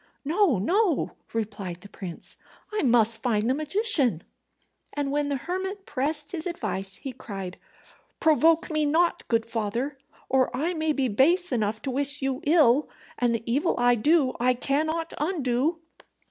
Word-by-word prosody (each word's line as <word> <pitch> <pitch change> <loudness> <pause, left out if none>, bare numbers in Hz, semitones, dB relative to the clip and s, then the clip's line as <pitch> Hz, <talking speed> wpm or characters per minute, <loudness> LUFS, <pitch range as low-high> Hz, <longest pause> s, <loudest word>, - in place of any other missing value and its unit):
"No, 330 - +3
no," 350 - +1 0.2
replied 205 -5 -4
the 200 - -11
prince; 185 -4 -8 0.4
"I 425 - 0
must 230 -4 +3
find 225 -3 +1
the 255 - +3
magician." 300 - +2 0.7
And 285 -1 -2
when 290 0 0
the 285 - 0
hermit 375 +7 -4
pressed 290 +2 -2
his 330 0 -4
advice, 195 - -4
he 275 - -6
cried, 195 -6 -7 0.6
"Provoke 320 +1 +3
me 310 -1 +1
not, 325 +4 +1
good 230 -1 +1
father, 235 +5 -3 0.3
or 260 -1 +2
I 330 +6 0
may 315 -1 0
be 275 -3 0
base 325 - +3
enough 215 -2 -1
to 270 - -2
wish 285 +2 -1
you 270 +1 -2
ill; 295 -4 +4 0.3
and 240 -1 +2
the 230 - -4
evil 285 +9 +1
I 245 0 +4
do 270 +3 +3
I 250 +1 +3
cannot 315 +6 -1
undo." 300 -1 0
275 Hz, 155 wpm, -26 LUFS, 230-320 Hz, 0.7 s, ill